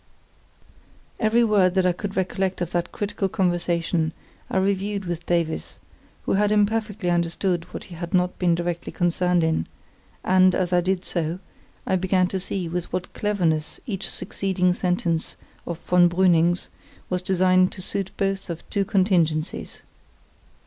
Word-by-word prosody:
Every 230 +1 +3
word 195 -5 +3
that 190 -1 +3
I 180 - +4
could 195 +3 -5
recollect 190 0 -1
of 175 -1 -3
that 175 0 -1
critical 200 -1 -2
conversation 175 -3 0 0.4
I - - -1
reviewed 200 +1 0
with 175 -1 -4
Davies, 170 -2 -1 0.5
who - - 0
had 205 +1 +2
imperfectly 210 -2 +1
understood 170 +1 0
what - - -6
he - - -12
had 170 0 -6
not 180 -1 +1
been 175 -2 +3
directly 175 0 -3
concerned 175 0 +1
in; 160 - 0 0.6
and, 185 0 +4
as 185 -1 0
I 175 - +4
did 185 +1 -1
so, 170 0 -1 0.5
I 190 - +2
began 185 0 +2
to 190 - -2
see 185 -1 -3
with 175 +1 -4
what 180 - -4
cleverness 170 -7 -1
each 200 -8 -3
succeeding 185 -1 0
sentence 180 -3 -1 0.3
of 170 - -3
von 175 0 +4
Brüning's 175 -1 +3 0.4
was 180 -1 -1
designed 185 0 +3
to 190 - -7
suit 195 0 -1
both 195 -1 -1
of 170 -1 -6
two 200 - +1
contingencies. 175 -5 0
180 Hz, 150 wpm, -24 LUFS, 175-195 Hz, 0.6 s, I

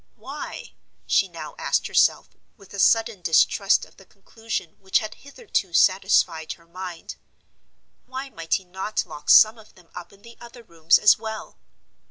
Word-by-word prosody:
Why—she - - -4
now - - -9
asked - - 0
herself, - - +2 0.3
with 200 -2 -18
a 200 - -7
sudden 225 -1 +2
distrust 195 +4 +2
of - - -24
the 195 - -17
conclusion 220 -3 -7
which 190 -1 +1
had 215 0 -4
hitherto 280 - -5
satisfied 185 -4 +2
her 170 - -22
mind—why 185 +8 -11
might 165 -5 -2
he 190 - -5
not 190 +4 -4
lock 150 -4 -10
some 220 +1 +7
of 215 - -19
them 175 -3 -22
up 180 - -10
in 200 0 -22
the 235 0 -15
other 240 0 -13
rooms 165 -4 +2
as 210 0 +5
well? 220 -1 -8
195 Hz, 155 wpm, -23 LUFS, 175-225 Hz, 0.3 s, some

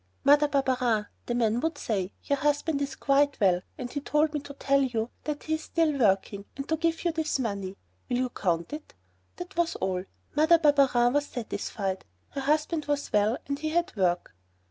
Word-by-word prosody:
"Mother 295 +1 +6
Barberin," 255 -6 +1 0.2
the 240 - -1
man 230 -1 +2
would 320 +2 -1
say, 200 -8 -2
"your 280 -1 0
husband 295 0 +1
is 280 -1 -2
quite 285 0 +2
well, 185 -4 +3 0.2
and 245 -1 -5
he 285 - -2
told 300 +2 +1
me 300 - 0
to 280 0 -10
tell 275 0 +2
you 240 -3 -1
that 300 -1 -3
he's 315 0 -1
still 325 -3 +1
working, 200 -2 +1
and 275 +1 -5
to 320 - +3
give 330 +2 -1
you 340 - +3
this 320 -2 -1
money. 200 -6 -3 0.3
Will 245 - +1
you 255 0 0
count 170 - -1
it?" 300 0 -8 0.4
That 355 +2 -8
was 340 0 +1
all. 185 -1 -2 0.3
Mother 315 +3 +6
Barberin 275 -6 +4
was 290 0 +1
satisfied, 200 -5 -4 0.3
her 275 - -4
husband 305 +3 +1
was 290 -1 -2
well 210 +4 +3
and 280 0 -3
he 310 +1 -2
had 340 -2 0
work. 180 - 0
275 Hz, 190 wpm, -28 LUFS, 220-300 Hz, 0.4 s, Mother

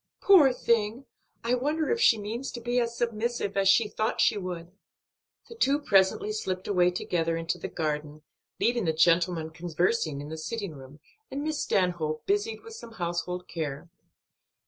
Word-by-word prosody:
"Poor 345 -9 +7
thing! 235 +1 0 0.4
I 235 +1 +1
wonder 300 +5 0
if 465 0 0
she 230 - +6
means 225 +6 -5
to 240 - -5
be 240 +1 0
as 235 -1 -2
submissive 235 -2 -2
as 195 -1 +3
she 215 +2 +5
thought 215 +1 -2
she - - +4
would." 180 -3 -5 0.8
The - - -10
two 285 - +2
presently 200 -5 +3
slipped 185 -3 -3
away 180 -3 +3
together 165 -2 -1
into 165 +2 -2
the - - -4
garden, 150 -1 -3 0.4
leaving 235 -3 +1
the 160 - +1
gentlemen 165 0 +2
conversing 165 -1 -1
in 145 +1 -7
the 160 0 -6
sitting 200 0 -4
room, 140 +1 -13 0.3
and 285 +2 -4
Miss 310 -1 -2
Stanhope 175 -5 0
busied 415 +3 0
with 455 - -10
some 235 - -10
household 180 -1 -3
care. 155 -1 -5
195 Hz, 170 wpm, -28 LUFS, 165-240 Hz, 0.8 s, Poor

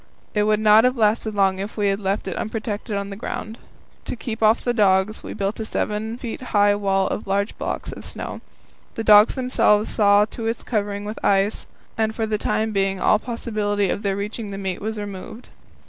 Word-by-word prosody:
It 210 - +2
would 215 0 +2
not 215 +1 +6
have 250 +1 +2
lasted 215 0 +1
long 190 -1 +2
if 200 +4 -6
we 205 -1 +2
had 195 0 0
left 195 0 -2
it 190 - -3
unprotected 215 -1 -4
on 200 0 -4
the - - -5
ground. 220 +1 -6 0.5
To - - -4
keep 225 -1 -6
off 220 +1 +4
the 245 - +1
dogs, 200 -1 +2
we - - -7
built 200 +2 -2
a - - -3
wall - - -3
7 220 +2 -2
feet 240 -1 -6
high 205 -5 +3
of 195 0 0
large 200 +2 0
blocks - - -4
of - - -9
snow. - - -7 0.5
The 225 - -3
dogs 210 0 +7
themselves 240 -4 +2
saw 205 -1 +5
to 225 +1 -6
its 230 +1 -2
covering 205 -2 -2
with 215 +2 -7
ice, 200 +2 +1 0.3
and 220 0 +1
for 225 - -1
the 215 -1 -1
time 220 +1 0
being 195 -1 0
all 210 - +3
possibility 210 -4 -1
of 205 - -2
their 195 -2 -1
reaching 210 +1 -4
the 195 - -6
meat 190 -2 -4
was 220 +1 -3
removed. 205 +3 -8
210 Hz, 210 wpm, -22 LUFS, 200-220 Hz, 0.5 s, dogs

